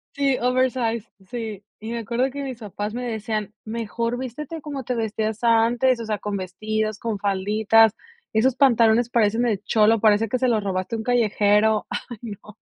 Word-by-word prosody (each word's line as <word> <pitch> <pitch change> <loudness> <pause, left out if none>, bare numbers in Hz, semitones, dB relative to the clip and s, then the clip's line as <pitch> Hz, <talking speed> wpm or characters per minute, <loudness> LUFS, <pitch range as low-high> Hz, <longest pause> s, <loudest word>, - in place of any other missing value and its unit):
Sí, 275 -2 +2
oversize, 245 -3 0 0.2
sí. 220 -4 -5 0.2
Y 220 +2 -6
me 235 - -2
acuerdo 240 +4 0
que 285 +1 -5
mis 255 -3 -6
papás 210 0 -5
me 250 +1 -4
decían: 215 -2 -3
"Mejor 230 +2 -3
vístete 270 +6 -6
como 280 -3 -5
te 250 +1 -2
vestías 220 0 -2
antes, 235 +2 +3
o 230 - -5
sea, 215 -1 -1
con 205 0 -4
vestidos, 215 +3 -2
con 220 -4 -3
falditas. 210 +3 +3 0.4
Esos 245 +4 +3
pantalones 235 -3 +4
parecen 225 0 +2
de 215 -5 +1
cholo, 220 0 +3
parece 215 +1 +4
que 255 +4 -1
se 255 - +2
los 220 -4 +1
robaste 190 +3 -2
a - - -2
un 220 - -4
callejero". 215 -2 +2 0.2
Ay, 240 - -7
no. 210 -1 -9
225 Hz, 180 wpm, -23 LUFS, 210-245 Hz, 0.4 s, pantalones